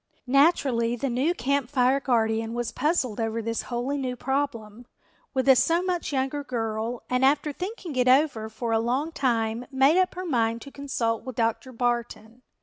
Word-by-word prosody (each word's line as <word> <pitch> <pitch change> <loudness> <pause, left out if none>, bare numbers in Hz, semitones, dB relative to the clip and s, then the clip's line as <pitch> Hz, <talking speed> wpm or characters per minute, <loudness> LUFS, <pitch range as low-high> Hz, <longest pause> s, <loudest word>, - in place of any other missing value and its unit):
Naturally 260 -4 +3
the 255 +2 -2
new 275 +9 +1
Camp 280 -2 0
Fire 260 0 +3
guardian 225 -3 0
was 240 -1 -2
puzzled 270 -8 0
over 225 0 -1
this 230 0 -2
wholly 255 +4 -3
new 255 -2 -3
problem, 245 -4 -3 0.5
with 260 0 0
a 265 - +8
so 330 +8 +2
much 360 -3 -2
younger 270 +1 -1
girl, 225 -2 -3
and 250 +1 0
after 290 +2 +2
thinking 365 - -6
it 250 0 +2
over 255 -5 +3
for 230 +1 -4
a 225 - +3
long 255 +8 -1
time 235 -4 -1
made 270 +5 +4
up 370 - -1
her 370 +1 -5
mind 230 -7 0
to 280 - -11
consult 235 -6 -2
with 255 -1 -7
Dr. 230 +3 -1
Barton. 240 -1 -3
250 Hz, 175 wpm, -26 LUFS, 230-280 Hz, 0.5 s, a